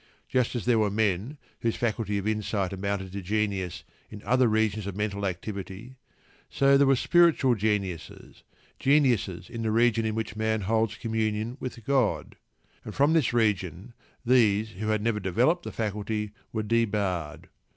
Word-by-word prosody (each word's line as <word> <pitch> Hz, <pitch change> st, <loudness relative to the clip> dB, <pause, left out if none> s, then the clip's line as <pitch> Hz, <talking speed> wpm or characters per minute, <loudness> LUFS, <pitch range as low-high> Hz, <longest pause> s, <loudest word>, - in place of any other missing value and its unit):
Just 125 Hz, -1 st, 0 dB
as 120 Hz, -, -3 dB
there 120 Hz, -2 st, +3 dB
were 105 Hz, -1 st, +2 dB
men 105 Hz, +5 st, -1 dB, 0.2 s
whose 115 Hz, -1 st, -1 dB
faculties 110 Hz, -3 st, -1 dB
of 100 Hz, +1 st, -3 dB
insight 105 Hz, -3 st, -1 dB
amounted 95 Hz, -1 st, -3 dB
to 100 Hz, +1 st, -5 dB
genius 100 Hz, -2 st, -2 dB, 0.3 s
in 105 Hz, -1 st, -10 dB
other 125 Hz, 0 st, +3 dB
regions 110 Hz, -2 st, 0 dB
of 100 Hz, -, -5 dB
mental 100 Hz, -1 st, -2 dB
activity, 95 Hz, +5 st, -6 dB, 0.5 s
so 140 Hz, 0 st, +4 dB
there 140 Hz, 0 st, +5 dB
were 135 Hz, -, +5 dB
spiritual 165 Hz, -3 st, +4 dB
geniuses, 100 Hz, -5 st, -3 dB, 0.4 s
geniuses 125 Hz, -, +2 dB
in 115 Hz, -1 st, -6 dB
the 110 Hz, -, -1 dB
region 115 Hz, 0 st, +3 dB
in 110 Hz, -1 st, -1 dB
which 110 Hz, -2 st, -3 dB
man 110 Hz, 0 st, 0 dB
holds 110 Hz, +2 st, 0 dB
communion 110 Hz, 0 st, -2 dB
with 120 Hz, -3 st, -7 dB
God, 135 Hz, -6 st, 0 dB, 0.5 s
and 105 Hz, -, -8 dB
from 145 Hz, +3 st, +3 dB
this 160 Hz, -8 st, +3 dB
region 105 Hz, -2 st, -1 dB, 0.3 s
these 110 Hz, -4 st, +3 dB
who 110 Hz, +1 st, -5 dB
had 110 Hz, -1 st, 0 dB
never 115 Hz, -2 st, 0 dB
developed 120 Hz, -, +1 dB
the -, -, -7 dB
faculty 105 Hz, 0 st, -3 dB, 0.2 s
were 110 Hz, -1 st, -2 dB
debarred. 100 Hz, -8 st, -1 dB
110 Hz, 160 wpm, -27 LUFS, 100-120 Hz, 0.5 s, there